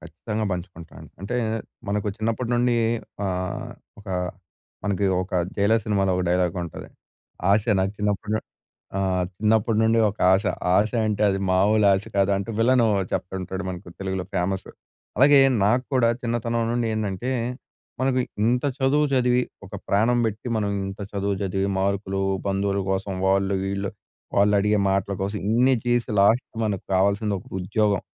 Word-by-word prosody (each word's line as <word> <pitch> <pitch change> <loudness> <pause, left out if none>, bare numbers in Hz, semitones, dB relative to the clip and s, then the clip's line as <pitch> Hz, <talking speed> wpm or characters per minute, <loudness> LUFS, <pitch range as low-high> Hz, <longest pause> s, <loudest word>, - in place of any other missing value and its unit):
ఖచ్చితంగా 110 +1 -4
పంచుకుంటాను. 85 -2 -8
అంటే 105 +6 -3 0.5
మనకు 105 +1 -1
చిన్నప్పటి 115 +2 -2
నుండి 120 0 +2 0.5
ఆహ్, 90 -1 -3 0.3
ఒకా 100 -2 -5 0.7
మనకి 100 -1 0 0.2
ఒక 95 - -10 0.3
'జైలర్' 110 +2 +3
సినిమాలో 100 -3 +1
ఒక 90 - 0
డైలాగ్ 90 -1 +1
ఉంటది. 85 - -9 0.6
"ఆశ 105 +2 +4 0.2
నాకు 95 +1 0
చిన్నప్పుడు 105 0 -1
ను 110 - 0 0.6
ఆహ్, 95 -2 +1
చిన్నప్పుడి 110 +1 +2
నుండి 115 +1 +3
ఒక 105 - -10
ఆశ. 95 +2 +2 0.3
ఆశ 105 +3 +3 0.2
అంటే 105 -1 -1
అది 95 0 0
మాములు 100 +3 +4
ఆశ 95 +1 0
కాదు" 100 0 +3
అంటూ 100 +3 -5
విలన్ 120 +1 +4 0.3
చెప్తుంటాడు. 95 +1 -3
మనకి 90 -1 -7
తెలుగులో 95 -1 -3
ఫేమస్. 95 +2 -1 0.5
అలాగే 140 +1 +7 0.2
నాక్కూడా 125 +2 +2
చిన్నతనం 115 0 -1
నుండి 120 -1 0
ఏందంటే 110 +3 -2 0.7
మనకు 130 0 +1 0.3
ఇంత 125 +3 +1
చదువు 140 +3 +3
చదివి 125 -1 +3 0.3
ఒక - - -9
ప్రాణం 115 +5 +3
బెట్టి 110 +2 -4
మనం 105 -2 0 0.2
ఇంత 95 +1 -8
చదువు 100 0 -1
చదివి 95 0 -1
మార్కులు 95 0 -1 0.3
బంధువుల 100 0 0
కోసం, 95 +1 -2
వాళ్ళు 95 0 +2
వీళ్ళు 100 0 -2 0.5
వాళ్ళు 100 +1 +4
అడిగే 105 +1 +2
మాటల 100 +1 0
కోసం 100 +2 -2
ఇన్ని 125 +4 +4
చేసి 120 0 +1
లాస్ట్ 110 +6 +4 0.2
మనకు 105 -4 -2
కావాల్సింది 100 +2 +2
ఒక - - -17 0.2
ఉద్యోగం. 100 +2 +1
100 Hz, 145 wpm, -24 LUFS, 95-115 Hz, 0.7 s, అలాగే